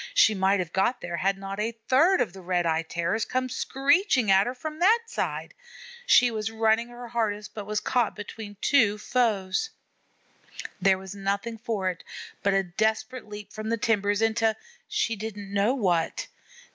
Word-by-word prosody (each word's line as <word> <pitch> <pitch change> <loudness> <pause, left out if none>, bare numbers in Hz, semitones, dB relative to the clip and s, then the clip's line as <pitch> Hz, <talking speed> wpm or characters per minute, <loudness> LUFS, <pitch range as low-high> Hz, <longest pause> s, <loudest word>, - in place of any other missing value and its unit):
She 360 - +6
might 195 0 +2
have 175 -3 -4
got 215 +6 +1
there 175 -1 -4
had 195 +4 +1
not 195 +1 -6
a 225 +2 -2
third 330 +9 +4
of 225 -8 -1
the 190 - -10
Red 175 -1 0
eyed 165 0 0
Terrors 170 +6 -1
come 255 +1 -1
screeching 270 - +2
at 195 +2 +5
her 250 - -3
from 310 +4 -6
that 435 +6 +5
side. 460 - -3 0.5
She 245 - +6
was 220 -1 -2
running 225 +1 +2
her 240 0 -10
hardest, 215 -3 -2
but 205 -2 -7
was 210 0 0
caught 240 -2 0
between 210 0 -8
two 225 -8 +3
foes. 215 - 0 1.1
There 190 0 +4
was 190 0 -9
nothing 200 +3 -3
for 215 -4 -2
it 175 - -12 0.4
but 200 -1 +2
a 195 - +3
desperate 220 +7 -2
leap 210 -1 -9
from 215 0 -5
the 230 - +1
timbers 205 -1 +1
into 225 0 +2 0.3
she 425 - 0
didn't 205 -2 -7
know 205 +6 +2
what. 175 -9 0
215 Hz, 175 wpm, -26 LUFS, 195-240 Hz, 1.1 s, She